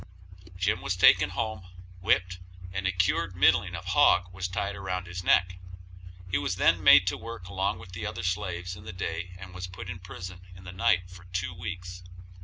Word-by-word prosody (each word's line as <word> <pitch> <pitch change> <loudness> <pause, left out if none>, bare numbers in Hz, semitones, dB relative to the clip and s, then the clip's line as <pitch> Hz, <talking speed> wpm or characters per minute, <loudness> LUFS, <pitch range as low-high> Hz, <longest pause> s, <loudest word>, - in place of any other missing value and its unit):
Jim 90 -1 0
was 90 - -1
taken 95 +1 +6
home, 95 0 -4 0.3
whipped, 90 -2 +1 0.3
and 95 0 -1
a - - +2
cured 90 -1 0
middling 90 0 +3
of - - -7
a - - -5
hog 90 0 +4
was 95 0 -3
tied 100 +2 -3
around 95 -2 -3
his 90 +1 -6
neck; 90 0 +3 0.7
he 95 - +2
was 95 -1 -1
then - - +3
made - - +8
to - - 0
work 115 -6 -8
along 95 0 -1
with 90 0 -12
the 90 - -6
other 90 - -4
slaves 90 -1 -2
in 100 - -12
the 90 - -8
day 90 -1 -4
and 95 -1 -10
was 90 0 -6
put 90 0 -8
in 90 - -7
prison 90 0 -9
in 90 - -13
the 90 - -8
night 90 -1 +2
for 90 0 -13
two 90 +1 -3
weeks. 90 0 -7
90 Hz, 205 wpm, -28 LUFS, 90-95 Hz, 0.7 s, made